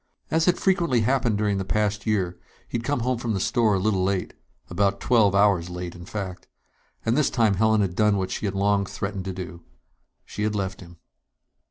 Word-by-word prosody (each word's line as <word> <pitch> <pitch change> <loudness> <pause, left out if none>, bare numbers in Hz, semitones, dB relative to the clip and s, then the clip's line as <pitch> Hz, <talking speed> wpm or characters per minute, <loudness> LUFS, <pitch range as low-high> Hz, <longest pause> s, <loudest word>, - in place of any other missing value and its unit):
As 160 0 +2
had 180 -1 +3
frequently 170 - +2
happened 120 -2 +1
during 105 -2 0
the - - -1
past 105 +2 -1
year, 95 -5 0 0.3
he'd 115 - -3
come 140 0 -1
home 125 0 0
from 115 -3 -2
the - - -1
store 110 +1 +2
a - - +1
little 95 -1 +1
late... 95 -1 -1 0.3
about 100 +1 0
twelve 110 -5 +3
hours 100 -4 +3
late, 90 -1 -5
in 85 0 -11
fact. 95 -4 -6 0.6
And 115 - +2
this 150 -1 +3
time 115 -5 +2
Helen 110 +2 +3
had 95 -3 -1
done 105 -1 +3
what 95 -1 -2
she 105 - -2
had 100 - -3
long 100 0 +2
threatened 100 -2 -4
to 95 - -3
do. 90 -2 -7 0.6
She - - -7
had 105 0 0
left 95 -1 -3
him. 85 -1 -13
100 Hz, 205 wpm, -25 LUFS, 95-115 Hz, 0.6 s, had